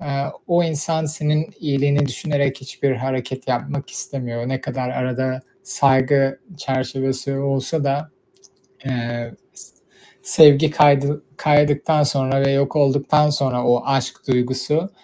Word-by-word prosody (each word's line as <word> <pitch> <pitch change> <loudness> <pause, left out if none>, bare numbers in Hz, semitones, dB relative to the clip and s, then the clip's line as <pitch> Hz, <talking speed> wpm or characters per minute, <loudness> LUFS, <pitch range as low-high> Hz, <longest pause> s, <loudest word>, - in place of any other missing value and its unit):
aaa, 140 -2 -3 0.2
o 175 0 +2
insan, 160 0 -2
senin 150 +1 -1
iyiliğini 145 -1 +1
düşünerek; 140 0 -2
hiçbir 135 +1 -3
hareket 130 +1 -4
yapmak 130 +3 -3
istemiyor. 120 -3 -5
Ne 130 0 -2
kadar 125 0 -4
arada 130 +1 -2 0.2
saygı 135 0 +2 0.2
çerçevesi 135 0 -3
olsa 135 +2 -1
da, 145 +2 -2 0.7
eee 120 -2 -4 0.2
s - - -15 0.7
sevgi 150 0 +7
kaydı 145 -1 +3
kaydıktan 150 +1 +3
sonra 135 -1 +1
ve - - +3
yok 140 +2 0
olduktan 145 +1 +3
sonra 130 -4 -1
o 120 0 +3
aşk 135 -2 -1
duygusu 130 +7 0
135 Hz, 120 wpm, -20 LUFS, 130-145 Hz, 0.7 s, sevgi